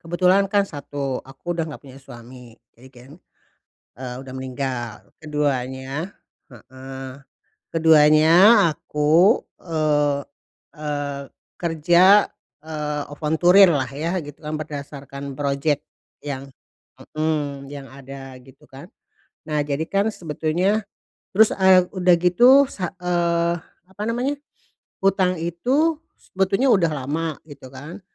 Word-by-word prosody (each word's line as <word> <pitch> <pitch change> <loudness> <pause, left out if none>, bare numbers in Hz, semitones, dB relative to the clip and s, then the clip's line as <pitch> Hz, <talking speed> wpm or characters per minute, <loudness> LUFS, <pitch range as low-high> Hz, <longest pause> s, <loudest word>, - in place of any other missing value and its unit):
Kebetulan 180 +4 +2
kan 200 -1 +3
satu, 140 -4 -5
aku 140 +6 -7
udah 165 - -1
enggak 150 - -10
punya 135 0 -13
suami, 120 -2 -13 0.2
jadi 125 +3 -17
kan, 125 +1 -16 0.9
eee, 125 -1 -6
udah 130 -1 -10
meninggal. 130 -3 -4 0.3
Keduanya 145 +2 -3 0.4
heeh, 130 +2 -10 0.6
keduanya 155 -1 +5 0.4
aku, 160 +10 +2 0.2
eee 150 -3 0 0.6
eee, 145 -2 -4 0.4
kerja, 175 +4 +4 0.4
eee, 150 -2 -4
volunteer 175 +6 +5
lah 135 -5 0
ya 165 +7 -3
gitu 145 0 -11
kan 150 - -5
berdasarkan 140 -2 -7
project 140 +1 0 0.4
yang 140 -1 -6 0.7
mmm, 145 -3 -2
yang 140 -1 -9
ada 135 -1 -10
gitu 130 +1 -19
kan. 140 +7 -12 0.6
Nah, 150 -1 0
jadi 150 +2 -2
kan 200 +2 +1
sebetulnya 175 +6 -1 0.5
terus, 215 +2 +5
eee, 190 -1 +5
udah 180 -2 +3
gitu 245 +11 +6
sa 180 -3 -5
eee, 170 -1 +1 0.4
apa 205 +2 -8
namanya, 250 +5 -1 0.7
hutang 190 -2 +2
itu 255 - 0 0.2
sebetulnya 195 +7 0
udah 170 -5 +2
lama 160 +2 -3
gitu 140 -3 -12
kan. 160 +9 -10
150 Hz, 115 wpm, -22 LUFS, 140-180 Hz, 0.9 s, gitu